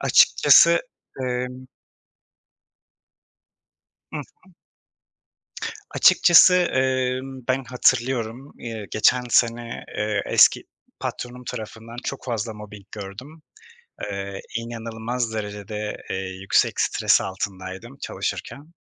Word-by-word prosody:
açıkçası, - - +6 0.4
emm 125 0 -3 2.5
I - - -4
hı. 185 +6 -13 1.4
Açıkçası, 180 +1 +7
emm, 130 -5 0
ben 130 +1 +1
hatırlıyorum, 125 +1 0
eee, 110 -3 -6
geçen 125 +3 +3
sene, 115 0 +1
eee, 105 -1 0
eski - - +5 0.4
patronum 125 +1 -5
tarafından 110 +1 -7
çok 140 - -5
fazla 115 -3 -3
mobbing 105 -1 -11
gördüm. 115 +10 -9 0.7
Eee, 100 0 -5 0.2
inanılmaz 115 0 -4
derecede, 105 0 -5
eee, - - -1 0.2
yüksek 95 - +2
stres - - +3
altındaydım 95 +5 -6
çalışırken. 145 +2 -5
115 Hz, 85 wpm, -23 LUFS, 105-130 Hz, 2.5 s, Açıkçası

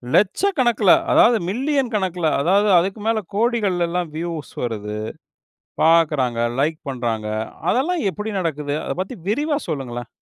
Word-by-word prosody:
லட்ச 205 -1 +3 0.2
கணக்குல, 240 +1 +4 0.2
அதாவது 310 -7 +6
மில்லியன் 265 +3 0
கணக்குல, 180 -4 0
அதாவது 200 +7 +3
அதுக்கு 190 +4 -2
மேல 225 -1 +2 0.2
கோடிகள்லலாம் 180 -7 0
வியூஸ் 165 -2 -5
வருது. 105 -3 -4 0.9
பார்க்குறாங்க, 150 -7 +3 0.2
லைக் 155 +2 0
பண்றாங்க. 115 -4 -3 0.4
அதெல்லாம் 330 +7 0
எப்படி 210 +3 -5
நடக்குது? 150 -4 -2
அத - - -2
பத்தி 190 +7 -4
விரிவா 290 +7 0
சொல்லுங்களேன். 120 -6 -4
180 Hz, 125 wpm, -21 LUFS, 145-225 Hz, 0.9 s, அதாவது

